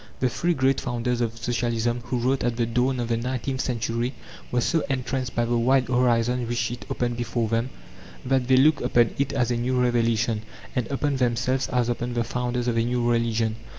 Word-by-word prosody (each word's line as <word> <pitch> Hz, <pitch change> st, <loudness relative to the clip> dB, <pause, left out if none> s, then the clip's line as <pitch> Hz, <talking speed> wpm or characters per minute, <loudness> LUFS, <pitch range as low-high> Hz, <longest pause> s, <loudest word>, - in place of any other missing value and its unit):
The 130 Hz, -, +2 dB
three 170 Hz, +7 st, 0 dB
great 135 Hz, 0 st, +2 dB
founders 120 Hz, -1 st, -1 dB
of 115 Hz, -1 st, -2 dB
Socialism 120 Hz, 0 st, -1 dB
who 125 Hz, +1 st, -2 dB
wrote 130 Hz, +3 st, 0 dB
at 120 Hz, -1 st, 0 dB
the 120 Hz, -, +2 dB
dawn 125 Hz, +3 st, 0 dB
of 120 Hz, -, -1 dB
the 115 Hz, -, +1 dB
nineteenth 130 Hz, +2 st, -2 dB
century 120 Hz, +1 st, -2 dB, 0.4 s
were 125 Hz, -, +2 dB
so 160 Hz, +7 st, +1 dB
entranced 130 Hz, -2 st, -2 dB
by 120 Hz, -, +2 dB
the 120 Hz, +1 st, 0 dB
wide 130 Hz, +1 st, +3 dB
horizons 120 Hz, -1 st, +2 dB
which 120 Hz, 0 st, -1 dB
it 120 Hz, -3 st, -7 dB
opened 120 Hz, -1 st, -1 dB
before 120 Hz, -1 st, -1 dB
them, 115 Hz, +3 st, 0 dB, 0.6 s
that 130 Hz, -1 st, +1 dB
they 130 Hz, -1 st, +5 dB
looked 145 Hz, +3 st, +5 dB
upon 120 Hz, -2 st, +3 dB
it 140 Hz, -1 st, +1 dB
as 125 Hz, -3 st, 0 dB
a 120 Hz, -, +1 dB
new 125 Hz, +2 st, 0 dB
revelation, 115 Hz, -2 st, +1 dB, 0.3 s
and 125 Hz, -4 st, 0 dB
upon 140 Hz, 0 st, -1 dB
themselves 125 Hz, +1 st, +1 dB
as 125 Hz, -2 st, +1 dB
upon 120 Hz, 0 st, -2 dB
the 120 Hz, -, +1 dB
founders 125 Hz, +1 st, -2 dB
of 120 Hz, -1 st, +1 dB
a -, -, +2 dB
new 120 Hz, 0 st, 0 dB
religion. 115 Hz, -2 st, +1 dB
120 Hz, 205 wpm, -25 LUFS, 115-130 Hz, 0.6 s, they